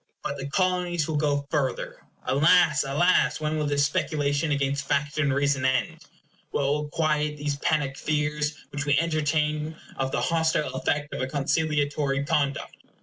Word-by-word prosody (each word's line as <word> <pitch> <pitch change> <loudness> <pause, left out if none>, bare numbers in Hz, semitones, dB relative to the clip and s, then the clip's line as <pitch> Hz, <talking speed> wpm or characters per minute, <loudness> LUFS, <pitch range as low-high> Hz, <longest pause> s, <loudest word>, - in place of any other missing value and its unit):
But 140 - -3
the 135 0 -5
Colonies 180 -2 0
will 160 - -2
go 145 -1 0
further. 140 -5 -2 0.2
Alas! 155 +3 +4
alas! 160 +7 +2
when 155 0 -1
will 150 - 0
this 145 0 +2
speculation 145 +1 0
against 140 -1 -1
fact 145 +1 0
and 140 -3 +2
reason 140 -1 +1
end? 130 0 0 0.5
What - - -1
will 145 +2 0
quiet 150 -1 0
these 145 -1 -2
panic 140 -2 0
fears 150 0 -1 0.2
which 145 0 -4
we 145 - +3
entertain 155 -1 0 0.2
of 135 0 -1
the - - -1
hostile 160 -3 +1
effect 145 +2 -1
of - - -3
a 130 - -1
conciliatory 145 -1 0
conduct? 140 -1 -1
145 Hz, 155 wpm, -26 LUFS, 140-155 Hz, 0.5 s, Alas